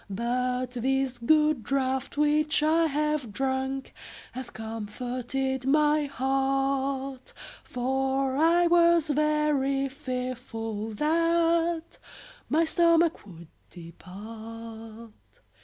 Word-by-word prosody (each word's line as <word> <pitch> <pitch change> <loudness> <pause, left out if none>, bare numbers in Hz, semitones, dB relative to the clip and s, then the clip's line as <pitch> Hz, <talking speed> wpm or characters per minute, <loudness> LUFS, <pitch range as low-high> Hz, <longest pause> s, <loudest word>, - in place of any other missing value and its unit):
But 250 +4 -1
this 260 +1 -1
good 300 +2 +3
draught 265 +3 -2
which 300 +1 +2
I 325 +2 +3
have 300 -4 -1
drunk 265 +3 -2 0.4
Hath 255 -1 -7
comforted 245 +4 -4
my 300 +1 +3
heart, 270 0 -1 0.3
For 265 +1 -1
I 335 +4 +4
was 340 -2 +4
very 295 -2 +1
fearful 250 -5 -5
that 335 +3 +1 0.5
My 325 +2 +3
stomach 335 0 +3
would 170 -3 -12 0.2
depart. 220 +6 -10
270 Hz, 85 wpm, -27 LUFS, 245-300 Hz, 0.5 s, I